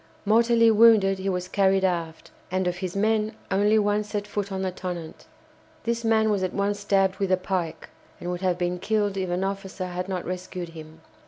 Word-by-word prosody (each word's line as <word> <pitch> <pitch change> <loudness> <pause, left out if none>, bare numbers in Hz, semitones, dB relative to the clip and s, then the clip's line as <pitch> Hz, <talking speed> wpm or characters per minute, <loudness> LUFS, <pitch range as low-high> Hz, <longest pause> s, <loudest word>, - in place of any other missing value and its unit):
Mortally 230 +1 +4
wounded, 210 -3 +5
he 195 +1 -2
was 180 -1 -2
carried 195 0 +2
aft, 170 -3 -2 0.2
and 185 0 0
of 180 0 -1
his 185 -1 -4
men 215 +1 +1 0.2
only 205 +3 +3
one 205 0 +2
set 205 -1 -4
foot 205 -1 -4
on 190 0 -2
the 185 - -1
"Tonnant." 175 -3 -7 0.6
This 235 0 -1
man 220 -1 +3
was 200 -2 0
at 185 - -2
once 205 +1 0
stabbed 195 -2 +1
with 195 -2 0
a 185 - +4
pike, 180 -3 -3 0.3
and 175 - -4
would 180 0 -4
have 180 -2 +1
been 180 0 -1
killed 205 0 0
if 190 -2 -2
an 180 +2 -1
officer 195 -1 -4
had 180 +1 -4
not 185 -2 -3
rescued 180 -1 -5
him. 160 -1 -12
190 Hz, 200 wpm, -25 LUFS, 180-205 Hz, 0.6 s, wounded